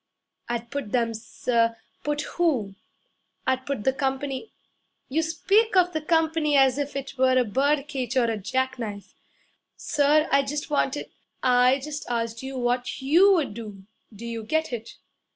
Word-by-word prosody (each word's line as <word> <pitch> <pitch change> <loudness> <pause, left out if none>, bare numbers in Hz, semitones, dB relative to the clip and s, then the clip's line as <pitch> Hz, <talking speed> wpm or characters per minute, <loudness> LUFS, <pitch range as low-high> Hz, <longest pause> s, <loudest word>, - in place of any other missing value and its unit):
'I'd 235 0 -3
put 280 -7 -4
them, 230 -2 +1
sir 230 +1 0
' - - -41
'Put 295 0 -1
who?' 270 - 0 0.7
'I'd 260 0 0
put 275 -6 -2
the 265 - +2
company 270 +4 -3 0.3
' - - -48
'You 310 +5 +1
speak 395 +7 +2
of 360 -1 +4
the 315 - -1
company 320 -2 +2
as 270 0 +4
if 285 0 -3
it 275 -1 -6
were 260 0 +4
a 250 - +3
bird 280 +6 +1
cage 260 -3 -3
or 255 - +5
a 225 -1 0
jack 260 +6 -2
knife.' 205 -3 -6 0.6
'Sir, 295 +2 +2
I 275 - +5
just 290 +2 -4
wanted 285 -1 0 0.2
' - - -43
'I 255 +1 +4
just 295 -2 -6
asked 230 -1 -2
you 265 0 -6
what 245 0 -1
YOU 345 +9 +6
would 315 - 0
do 205 -4 -9 0.3
do 220 +2 -10
you 230 -1 -4
get 315 +4 -1
it?' 230 -1 -6
265 Hz, 175 wpm, -25 LUFS, 235-295 Hz, 0.7 s, YOU